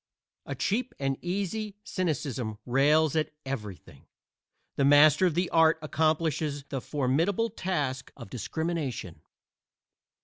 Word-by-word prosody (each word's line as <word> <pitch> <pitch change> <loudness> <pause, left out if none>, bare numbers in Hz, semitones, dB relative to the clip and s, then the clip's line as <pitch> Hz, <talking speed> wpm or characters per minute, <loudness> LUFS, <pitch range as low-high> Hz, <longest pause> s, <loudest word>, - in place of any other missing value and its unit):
A 140 - -3
cheap 230 - -1
and 135 -1 0
easy 200 +3 -3
cynicism 135 - -2
rails 145 +4 +3
at 155 -1 +1 0.2
everything. 105 -9 -7 0.7
The 140 - +1
master 145 +5 +6
of 165 - -1
the 180 +1 +1
art 160 0 +5
accomplishes 155 -2 0
the 135 -2 -3
formidable 160 - 0
task 145 -10 -2
of - - -10
discrimination. 130 - -3
155 Hz, 110 wpm, -28 LUFS, 135-175 Hz, 0.7 s, master